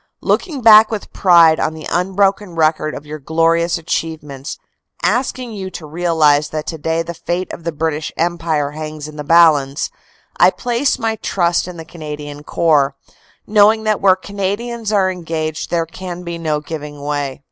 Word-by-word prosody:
"Looking 310 -9 -1
back 220 -1 +8
with 220 -3 -5
pride 170 -4 +5
on 155 - -1
the 155 - -9
unbroken 190 +1 +1
record 155 -1 +1
of 145 - -8
your 155 +1 -7
glorious 165 +3 +1
achievements, 155 -4 -4 0.5
asking 250 -1 0
you 195 -3 -5
to 170 - -8
realize 155 -2 +2
that 155 -1 -4
today 160 0 -2
the 170 +1 -6
fate 175 +3 -3
of 165 - -9
the 170 - -1
British 155 0 -2
Empire 165 -4 0
hangs 155 0 -6
in 155 - -11
the 150 - -5
balance, 150 -3 +4 0.5
I - - +7
place 245 +3 -1
my 225 -1 -1
trust 175 -4 0
in 180 -1 -8
the 165 - -8
Canadian 150 -3 -8
Corps, 145 -4 +2 0.5
knowing 215 +1 +4
that 215 -1 0
where 190 -2 +5
Canadians 205 +4 -4
are 195 -3 +2
engaged 160 -3 -4
there 170 -1 0
can 180 +1 -8
be 170 -1 -5
no 155 -2 -1
giving 150 -1 -7
way. 145 -2 -3
165 Hz, 165 wpm, -17 LUFS, 155-190 Hz, 0.5 s, back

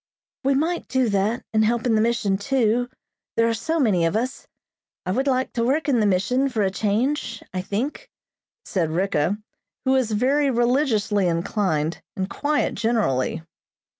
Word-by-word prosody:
"We 270 +1 +2
might 330 +5 -1
do 260 -3 +1
that 205 +4 0
and 220 0 +4
help 230 +2 +1
in 240 - +2
the 215 - +3
mission, 220 -4 +1
too, 245 0 +1 0.5
there 230 0 +4
are - - +1
so 320 +9 -1
many 205 - +3
of 165 - 0
us. 255 +5 -2 0.6
I 185 - -1
would 265 +8 0
like 260 -1 0
to 230 - 0
work 280 +7 +1
in 260 -5 +3
the 210 - +3
mission 250 +9 +1
for 225 -5 0
a 190 - +1
change, 230 +5 -1
I 185 - -1
think," 255 - -4 0.6
said 175 -6 -1
Ricka, 180 +1 0 0.5
who 260 - +3
was 260 -4 +2
very 270 +7 +2
religiously 235 -5 +2
inclined 170 -2 -1
and 190 0 -2
quiet 290 +7 0
generally. 205 - 0
230 Hz, 165 wpm, -23 LUFS, 200-260 Hz, 0.6 s, and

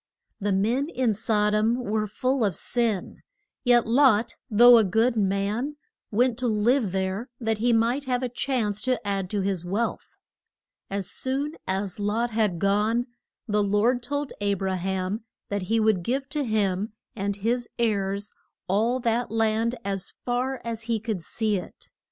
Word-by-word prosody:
The 205 -1 -1
men 230 +10 +1
in 255 -8 +1
Sod 210 0 +1
om 220 +2 +3
were 220 -3 -1
full 255 +4 0
of 200 -5 +1
sin, 230 -3 -1 0.4
yet 245 -2 +4
Lot, 235 -2 +4
though 240 +2 +8
a - - +4
good 225 +5 +2
man, 205 +7 0 0.3
went 240 +2 +2
to 250 - 0
live 220 0 +2
there 190 +6 -2
that 225 -3 -1
he 240 +2 +2
might 235 +5 +2
have 250 0 0
a - - +1
chance 220 -6 0
to 255 -5 -1
add 195 -2 -1
to 205 0 -1
his 190 -3 -1
wealth. 205 +6 -3 0.7
As 195 -1 -2
soon 270 +7 0
as 190 +1 -2
Lot 220 +4 0
had 215 -5 +1
gone, 210 +6 +1 0.4
the 210 -1 +2
Lord 210 +5 +2
told 285 +3 -3
A 200 -1 +1
bra 190 0 -2
ham 190 +3 -2 0.3
that 205 0 -1
he 225 0 +3
would 215 -4 +3
give 265 +8 -2
to 295 -1 -1
him 210 -3 0 0.2
and 200 -1 -2
his 235 +4 -1
heirs 200 -3 0 0.4
all 225 +7 +1
that 235 +1 0
land 225 +1 +1
as 195 -1 -3
far 255 +2 -1
as 230 -1 -3
he 230 -1 +1
could 215 -4 -3
see 215 +4 0
it. 180 - -10
220 Hz, 165 wpm, -26 LUFS, 200-240 Hz, 0.7 s, though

